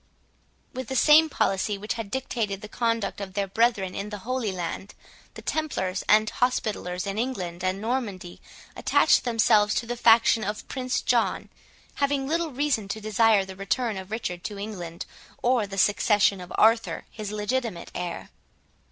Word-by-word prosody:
With 260 -2 -5
the 265 - -4
same 310 +4 +6
policy 200 -5 0
which 210 +2 -3
had 225 -3 -6
dictated 220 -5 -3
the - - -6
conduct 230 -3 -1
of 190 -2 -7
their 200 - 0
brethren 200 -2 +1
in 200 +1 -4
the 210 - -5
Holy 255 -4 -1
Land, 185 +2 -5 0.4
the - - -10
Templars 195 -12 -2
and 215 +1 +5
Hospitallers 210 -7 -1
in 200 +1 -3
England 185 -8 -3
and 185 +1 0
Normandy 210 -6 -4 0.3
attached - - +3
themselves 215 -3 +3
to 235 - -1
the 240 +1 -3
faction 230 -1 +5
of 210 +1 -4
Prince 255 -1 -2
John, - - +1 0.5
having 280 -1 +1
little 330 +2 0
reason 270 -6 -1
to 200 +2 -4
desire 215 -1 +3
the 190 0 -9
return 215 +4 -1
of 190 0 -7
Richard 180 -6 -4
to 205 - -5
England, 180 -5 -6 0.4
or 240 -4 +2
the 195 0 -7
succession 205 -1 +3
of 180 - -10
Arthur, 225 +1 +3
his 210 -2 -6
legitimate 215 -2 -3
heir. 180 -1 -5
215 Hz, 160 wpm, -26 LUFS, 195-240 Hz, 0.5 s, same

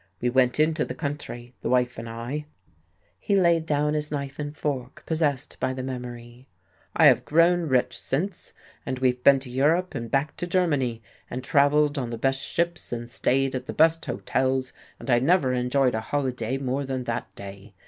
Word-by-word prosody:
We 125 +3 0
went 125 +1 +2
into 155 +1 +2
the - - -5
country, 140 -5 -5
the - - -2
wife 125 -2 +1
and 115 0 -6
I." 120 +7 -5 0.7
He 200 - 0
laid 170 -4 +3
down 150 0 +1
his 150 -1 -1
knife 140 -1 -4
and 145 0 -5
fork, 130 -4 -4
possessed 155 -5 -1
by 130 - 0
the 130 - -4
memory. 125 -1 -7 0.5
"I - - +5
have - - +6
grown 170 +2 +3
rich 130 -3 +1
since, 170 +7 -3 0.3
and 130 - -3
we've 125 -1 0
been 140 -1 +7
to 130 -2 -8
Europe 160 +8 +2
and 115 0 -5
back 140 +4 0
to 175 - -3
Germany, 145 - 0 0.3
and 125 +1 -5
travelled 145 0 +3
on 125 -3 -3
the 115 - -4
best 135 +3 +1
ships 170 +1 -2
and 120 0 -4
stayed 135 +3 +1
at 130 - -4
the - - -4
best 165 +1 +4
hotels, 130 0 -1 0.2
but 135 - -4
I 120 - +5
never 140 -1 +3
enjoyed 125 +1 +2
a 110 - -1
holiday 130 -2 -2
more 135 +1 -2
than 130 -2 -3
that 120 -1 -4
day. 100 0 -10
135 Hz, 190 wpm, -25 LUFS, 125-150 Hz, 0.7 s, been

